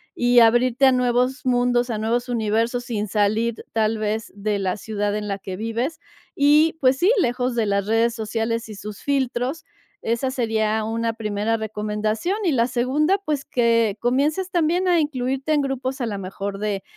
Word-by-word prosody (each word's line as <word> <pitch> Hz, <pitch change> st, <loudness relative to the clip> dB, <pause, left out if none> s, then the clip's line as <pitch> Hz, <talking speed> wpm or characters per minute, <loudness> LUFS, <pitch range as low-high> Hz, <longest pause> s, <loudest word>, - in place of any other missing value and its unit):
y 245 Hz, 0 st, +4 dB
abrirte 240 Hz, +3 st, +4 dB
a 265 Hz, -, +7 dB
nuevos 250 Hz, +1 st, +1 dB
mundos 245 Hz, -1 st, +2 dB
a 225 Hz, -, -2 dB
nuevos 230 Hz, +3 st, -1 dB
universos 230 Hz, +1 st, 0 dB
sin 215 Hz, -3 st, -3 dB
salir, 215 Hz, +3 st, 0 dB
tal 220 Hz, 0 st, +1 dB
vez 215 Hz, +1 st, -2 dB
de 205 Hz, 0 st, -1 dB
la 190 Hz, -2 st, -1 dB
ciudad 205 Hz, -1 st, -2 dB
en 210 Hz, -1 st, -4 dB
la 195 Hz, 0 st, -3 dB
que 190 Hz, -1 st, -6 dB
vives, 230 Hz, -, -3 dB, 0.4 s
y 300 Hz, +3 st, +4 dB
pues 260 Hz, 0 st, +4 dB
sí, 360 Hz, +8 st, +3 dB
lejos 245 Hz, -1 st, 0 dB
de 230 Hz, -2 st, +1 dB
las 200 Hz, -1 st, 0 dB
redes 230 Hz, +1 st, +2 dB
sociales 225 Hz, +1 st, -2 dB
y 215 Hz, -, -9 dB
sus 205 Hz, 0 st, -8 dB
filtros. 270 Hz, +1 st, -1 dB, 0.4 s
Esa 235 Hz, +3 st, -1 dB
sería 220 Hz, -4 st, 0 dB
una 230 Hz, +1 st, -1 dB
primera 215 Hz, 0 st, -1 dB
recomendación 215 Hz, -, -2 dB
y 350 Hz, -, +2 dB
la 235 Hz, -3 st, +3 dB
segunda, 265 Hz, +9 st, +1 dB
pues 300 Hz, -5 st, -2 dB
que 230 Hz, -3 st, +2 dB
comiences 295 Hz, +10 st, 0 dB
también 350 Hz, +2 st, +1 dB
a 345 Hz, -2 st, +4 dB
incluirte 270 Hz, 0 st, -1 dB
en 295 Hz, -, +3 dB
grupos, 270 Hz, -1 st, -3 dB
a 240 Hz, -, -1 dB
lo 205 Hz, -2 st, -3 dB
mejor 195 Hz, +1 st, -5 dB
de 205 Hz, -1 st, -2 dB
235 Hz, 175 wpm, -22 LUFS, 215-260 Hz, 0.4 s, a